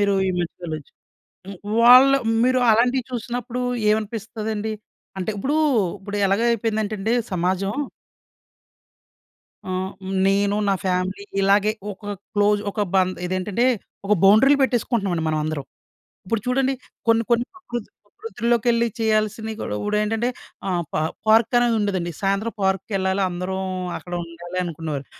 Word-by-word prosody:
మీరు 200 -1 +3
ఈ - - +2
మధ్య 175 - -3
వెళ్ళొచ్చు 155 -3 -6 0.6
హ్మ్. 195 -2 -8 0.2
వాళ్ళు 255 +3 +8 0.3
మీరు 255 0 +3
అలాంటివి 245 +3 +3
చూసినప్పుడుఏమనిపిస్తదండి? 220 -3 -2 0.4
అంటే 190 - -2
ఇప్పుడు 275 +9 -1 0.4
ఇప్పుడు 205 +1 -5
ఎలాగ 195 +3 +1
అయిపోయిందంటే 220 -2 -1
అండి 220 +4 0 0.2
సమాజం 185 +3 0 2.0
ఆహ్, 185 +1 -2 0.4
నేను 200 +1 +2
నా 195 - +3
ఫ్యామిలీ, 185 +2 -1 0.2
ఇలాగే 200 +2 +4 0.2
ఒక 205 +1 -7 0.2
క్లోజ్ 205 0 +3
ఒక 210 - -2
బం 185 -1 +4 0.2
ఇదేంటంటే, 185 +6 0 0.4
ఒక 210 - +3
బౌండరీలు 225 +9 +6
పెట్టేసుకుంటున్నామండి 225 -9 0
మనందరం. 155 -2 -2 0.6
ఇప్పుడు 220 +3 -1
చూడండి 265 +1 +1 0.3
కొన్ని, 230 0 +5
కొన్ని 235 +1 +3
ప్రకృతి 240 - -6 0.2
ప్రకృతి 410 - -11
లోకెళ్ళి 235 0 +2
చేయాల్సినవి 220 0 0
కూడా 105 - -3
ఇప్పుడేంటంటే, 210 +3 0 0.4
ఆహ్, 175 -2 0
పా - - +1 0.3
పార్క్ 225 +2 +4
అనేది 240 -1 +2
ఉండదండి. 185 -4 -1
సాయంత్రం 200 +4 0
పార్క్‌కెళ్ళాలి 190 0 0
అందరం, 185 +2 -3 0.4
అక్కడ 175 - -12
ఉండాలి 175 +2 -7
అనుకునేవారు. 155 -4 -4
210 Hz, 120 wpm, -22 LUFS, 190-230 Hz, 2.0 s, వాళ్ళు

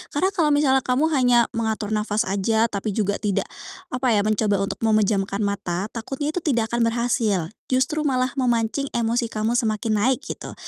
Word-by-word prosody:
Karena 370 +6 +2
kalau 335 -5 +1
misalnya 290 -2 +3
kamu 265 +5 +1
hanya 245 -4 +4
mengatur 220 -2 -2
nafas 210 +1 0
aja, 220 +4 +1
tapi 200 0 -3
juga 205 -2 0
tidak, 205 -3 -1 0.4
apa 250 -2 +1
ya, 205 - +2
mencoba 215 -1 +1
untuk 195 - -4
memejamkan 210 -2 +1
mata, 200 -1 -2
takutnya 270 +6 -4
itu 315 - -4
tidak 245 -10 0
akan 235 0 +1
berhasil. 230 -7 0 0.2
Justru 265 +4 0
malah 255 -2 +1
memancing 240 +1 0
emosi 235 +1 0
kamu 225 +1 -1
semakin 215 -1 0
naik, 255 +6 +1
gitu. 310 - -7
230 Hz, 170 wpm, -23 LUFS, 210-255 Hz, 0.4 s, hanya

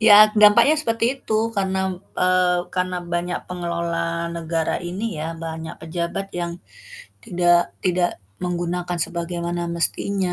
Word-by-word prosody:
Ya, 215 -1 +8
dampaknya 210 +8 +7
seperti 230 -5 0 0.2
itu - - -5 0.2
karena 190 -1 0
m - - -5 0.2
eee, 180 -1 +2
karena 185 0 0 0.2
banyak 175 +1 -1
pengelola 170 -1 -2
negara 165 -1 -1
ini 180 +4 -4
ya, 155 - -3 0.2
banyak 160 0 -5
pejabat 170 +4 -3
yang 170 0 -2 0.7
tidak 175 -4 +3
tidak 180 - +1 0.2
menggunakan 175 0 -2
sebagaimana 175 0 -3
mestinya. 180 +2 0
175 Hz, 120 wpm, -22 LUFS, 170-185 Hz, 0.7 s, Ya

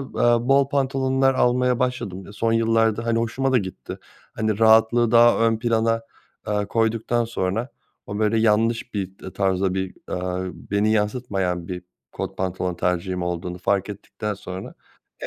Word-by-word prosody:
eee, 120 -2 +1
bol 135 0 +4
pantolonlar 135 -1 +1
almaya 125 0 +2
başladım 100 -7 -3
son 115 +2 0
yıllarda 115 0 +2
hani 115 0 +1
hoşuma 130 +4 -1
da 130 - +5
gitti. 95 -4 -7 0.4
Hani 110 -1 -1
rahatlığı 115 +1 +5
daha 120 0 +6
ön 115 -1 +1
plana, 115 -1 +1 0.4
eee, 105 -1 -1
koyduktan 115 +1 0
sonra, 115 +2 -2 0.4
o 105 +1 -5
böyle 110 +1 +2
yanlış 115 +2 +1
bir, 95 -2 -3
eee, 95 - -8
tarzda 95 -1 0
bir, 95 -1 -3
aaa, 90 0 -3
beni 100 +6 0
yansıtmayan 100 -5 -1
bir 90 0 -5 0.3
kot - - -5
pantolon 90 -1 -2
tercihim 90 +1 -1
olduğunu 90 0 -3
fark 100 +2 0
ettikten 105 +1 -5
sonra. 95 -1 -8 0.5
E - - -3
110 Hz, 150 wpm, -23 LUFS, 95-120 Hz, 0.5 s, daha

